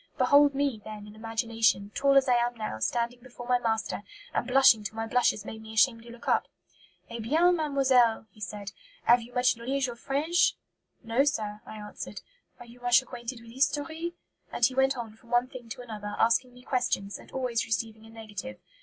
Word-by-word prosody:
Behold 285 +1 +5
me, 275 -6 0
then, 215 -1 -8
in 210 - -12
imagination, 225 -2 0
tall 275 0 +4
as 270 - +4
I 250 - +4
am 240 0 +1
now, 215 - -4
standing 235 - -1
before 245 -1 -11
my 250 0 +3
master, 225 -3 -1 0.3
and 240 - -1
blushing 250 -4 +6
till 205 - -6
my 225 0 -2
blushes 225 -3 +1
made 220 0 -7
me 220 0 -10
ashamed 230 +1 +4
to 235 - -13
look 235 0 -12
up. - - +2 0.6
'Eh 235 - -5
bien, 320 +10 +3
mademoiselle,' 265 -8 +3
he 215 - -19
said, 205 0 -6 0.3
'have 240 +1 +5
you 235 +2 -11
much 250 0 +3
knowledge 260 +3 -1
of 235 -1 -7
French?' 335 +6 +2 0.5
'No, 230 +4 +2
sir,' 215 -8 -1
I - - -8
answered. 210 0 -8 0.4
'Are 245 - -10
you 235 +1 -15
much 245 +1 +5
acquainted 235 -1 -7
with 230 0 -13
history?' 300 +6 -1 0.4
And 240 - +3
he 260 - +1
went 265 0 +2
on 225 -3 -6
from 230 +1 -22
one 240 +1 +3
thing 250 -3 -11
to 245 - -7
another, 210 -3 -6
asking 240 +2 +2
me 250 - -15
questions, 240 -6 -1
and - - -15
always 250 -3 -1
receiving 225 -1 -2
a 225 - -14
negative. 225 +3 -8
240 Hz, 200 wpm, -28 LUFS, 225-260 Hz, 0.6 s, blushing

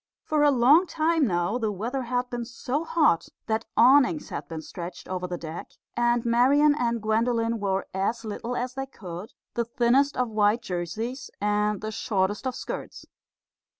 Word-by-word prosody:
For 305 -1 +1
a 295 - +6
long 285 +7 +5
time 320 -3 +2
now 175 +5 0
the 220 -3 0
weather 235 +7 -3
had 250 0 -1
been 240 -1 -3
so 250 +5 -3
hot 300 - +2 0.2
that 220 +1 -1
awnings 280 +4 +5
had - - -5
been 160 -1 -6
stretched 175 +1 -8
over 180 -1 -3
the 180 -1 -4
deck; 165 0 -8 0.2
and 240 0 +2
Marian 270 +6 +4
and 235 -5 0
Gwendolen 230 +1 +1
wore 195 -1 -1
as 225 +5 -1
little 230 +3 -4
as 250 +1 -2
they 270 0 -4
could 185 -3 -9 0.2
the 235 - 0
thinnest 250 +5 +2
of 250 -1 +1
white 215 +1 +2
jerseys 220 +7 -4
and 210 0 0
the 215 0 -4
shortest 205 +1 -1
of 255 - -3
skirts. - - -6
235 Hz, 170 wpm, -26 LUFS, 205-255 Hz, 0.2 s, a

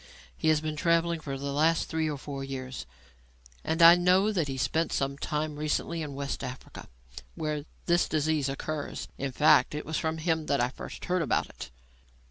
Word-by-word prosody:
He - - -2
has 155 -1 +4
been 155 -1 -3
travelling 170 +1 +2
for 140 -3 -5
the 140 +1 -4
last 160 +3 +2
three 160 -1 -1
or 150 - -3
four 140 0 -6
years, 130 - -6 0.8
and 160 +1 +2
I 165 +1 +11
know 180 +4 +4
that 170 -8 0
he 135 -1 -4
spent 160 +5 0
some 140 0 -1
time 150 +1 -3
recently 155 +2 -1
in 145 -3 -5
West 140 0 -4
Africa, 130 0 -8 0.5
where 150 -2 -3 0.2
this 175 0 +2
disease 155 -2 +1
occurs. 145 +2 -4
In 135 0 -2
fact, 150 +2 +4
it 150 - -4
was 160 +1 -2
from 160 0 -1
him 160 -1 -1
that 140 - +1
I 120 0 +2
first - - -8
heard 180 0 +1
about 160 - 0
it." 65 - -9
155 Hz, 190 wpm, -28 LUFS, 140-160 Hz, 0.8 s, I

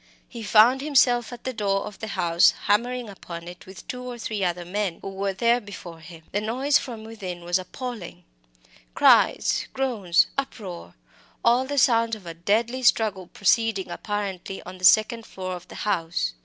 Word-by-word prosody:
He 235 - -9
found 225 +5 +5
himself 255 -5 +3
at 240 -1 -10
the 260 - -3
door 200 -3 0
of 210 - -9
the 220 - -5
house, 175 -4 +3
hammering 240 +4 +1
upon 170 -4 -9
it 175 +1 -11
with 190 0 -12
two 250 - -5
or 250 -1 -6
three 215 -3 -3
other 175 -1 -1
men 190 -1 -2
who - - -4
were 195 +1 -2
there 235 +5 +2
before 180 -5 -10
him. 165 0 -13
The 205 - -1
noise 260 +6 +2
from 230 -4 -7
within 190 -6 -7
was 175 +2 +1
appalling 185 -3 -7 0.7
cries, - - +4
groans, 220 -10 +2
uproar 185 - -7 0.5
all 240 +2 +4
the 285 +2 -4
sounds 230 -3 +3
of 205 -4 -14
a 170 - -6
deadly 220 +9 0
struggle 210 -6 +2
proceeding 210 +1 +1
apparently 195 -3 -4
on 185 +1 -10
the 185 - 0
second 220 +4 +4
floor 185 -1 -5
of 175 - -11
the - - -12
house. 170 - -1
205 Hz, 175 wpm, -25 LUFS, 180-235 Hz, 0.7 s, found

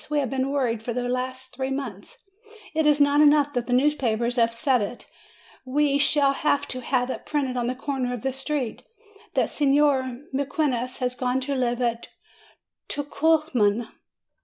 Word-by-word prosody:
We 300 - 0
have 275 -5 0
been 265 0 0
worried 250 -6 0
for 235 +1 -4
the 245 +1 -2
last 255 +1 -3
three 265 +1 -2
months. 270 - -5 0.6
It 315 -1 +2
is 295 -1 +4
not 285 +1 +4
enough 290 -1 +5
that 245 -1 -2
the - - -4
newspapers 245 -3 +1
have 230 -1 +3
said 250 +1 +1
it. 205 +4 -5 0.6
W 295 +3 +2
T - - 0
e - - +3
shall 285 -1 +3
have 285 0 0
to 255 - -4
have 250 0 0
it - - -6
printed 275 -4 -1
on 240 -1 -1
the 255 - -1
corner 265 -2 -2
of 245 -2 -5
the 265 -1 -1
street, 270 -2 -3 0.5
that - - +3
Signor 275 -3 +2
Mequinez 265 -3 -1
has 250 -1 -1
gone 250 +1 -1
to 280 +2 -2
live 250 -2 0
at 235 -1 -1 0.8
Tucuman!" 285 -7 +1
260 Hz, 180 wpm, -25 LUFS, 245-285 Hz, 0.8 s, enough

